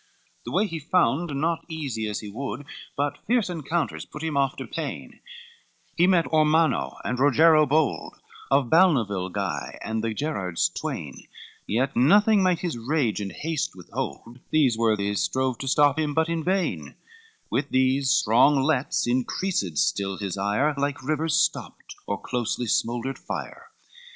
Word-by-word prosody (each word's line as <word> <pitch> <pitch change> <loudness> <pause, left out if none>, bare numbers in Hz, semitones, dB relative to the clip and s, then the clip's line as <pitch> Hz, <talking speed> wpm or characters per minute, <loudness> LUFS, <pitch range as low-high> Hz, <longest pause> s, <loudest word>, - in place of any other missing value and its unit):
CVIII - - -37
The 120 - -6
way 195 +9 +2
he 165 -5 -5
found 155 -1 +1
not 165 +2 0
easy 135 -9 -3
as 105 - -3
he 105 - -8
would, 140 +5 -5 0.3
But 145 +1 -1
fierce 230 -6 +1
encounters 165 0 -2
put 150 - -10
him 160 -2 -2
oft 135 -1 +1
to - - -5
pain, - - -6 0.8
He 175 +1 +4
met 180 -3 +3
Ormanno 155 +1 +2
and 125 - -2
Rogero 155 +3 +5
bold, 150 +2 0 0.3
Of 135 -2 +3
Balnavile, 115 - +3
Guy, - - -4
and 110 0 -3
the 115 - -1
Gerrards 100 - -1
twain; - - -6 0.4
Yet 130 +6 0
nothing 205 - +5
might 180 -3 +2
his 165 -9 -3
rage 120 -4 0
and 100 -1 -4
haste 160 - -3
withhold, 115 +6 -6
These 140 -7 +3
worthies 105 -3 +1
strove 130 -2 -1
to 135 - -5
stop 145 +2 +3
him, 150 -2 -1
but 160 +1 +2
in 165 -1 -1
vain, 190 +2 -1 0.6
With 140 +1 -1
these 130 +1 +2
strong 125 +7 +4
lets 140 -2 +1
increased 120 - -1
still 95 +3 0
his 100 -2 -4
ire, 105 +10 +1
Like 140 -1 -2
rivers 155 +1 0
stopped, - - -1
or - - -2
closely 120 0 -2
smouldered 120 +4 -1
fire. - - -7
140 Hz, 155 wpm, -25 LUFS, 115-160 Hz, 0.8 s, Rogero